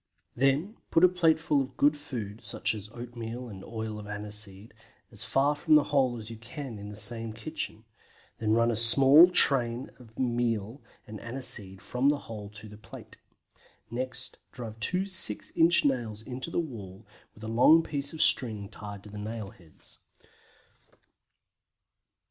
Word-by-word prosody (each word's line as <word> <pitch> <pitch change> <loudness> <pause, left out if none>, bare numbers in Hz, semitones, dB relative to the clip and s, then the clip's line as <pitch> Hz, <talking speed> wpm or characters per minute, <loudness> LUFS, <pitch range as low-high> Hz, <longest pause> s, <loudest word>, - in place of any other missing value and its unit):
Then 140 - 0
put 165 - +3
a - - +10
plateful 160 -5 +2
of 135 - -7
good 145 +1 +3
food, 120 -8 -7
such 110 0 -3
as 105 -1 -8
oatmeal 120 0 -7
and 95 -3 -10
oil 110 -2 -6
of 105 - -10
aniseed, 105 0 -4 0.4
as 105 -1 +1
far 140 +4 +1
from 155 +1 +2
the 150 - +6
hole 130 -4 +2
as 110 0 -9
you 115 - -8
can 115 0 -8
in 105 0 -8
the 105 - -9
same 115 +1 -4
kitchen; 115 -2 -5 0.6
then 110 -1 0
run 115 +1 +3
a - - -1
small 135 +9 +8
train 125 -7 +4
of 115 -3 -17
meal 120 -1 -2 0.2
and 110 -1 -9
aniseed 105 -6 -4
from 125 +6 +1
the 145 - +1
hole 105 -6 -9
to 105 +1 -11
the 105 0 -12
plate. - - -13 0.7
Next 130 +1 +1
drive 115 -3 -9
two 180 - 0
six 185 - +1
inch 165 0 +4
nails 115 -6 -1
in 125 +1 -7
the 165 +6 -5
wall, 110 - -7 0.3
with 105 - -15
a - - -5
long 125 +9 +5
piece 140 -2 -2
of 160 - +1
string 105 -6 +2
tied 100 -2 -10
to 105 - -12
the 105 - -8
nail 105 -1 -6
heads. 80 -4 -16
115 Hz, 165 wpm, -28 LUFS, 105-135 Hz, 0.7 s, a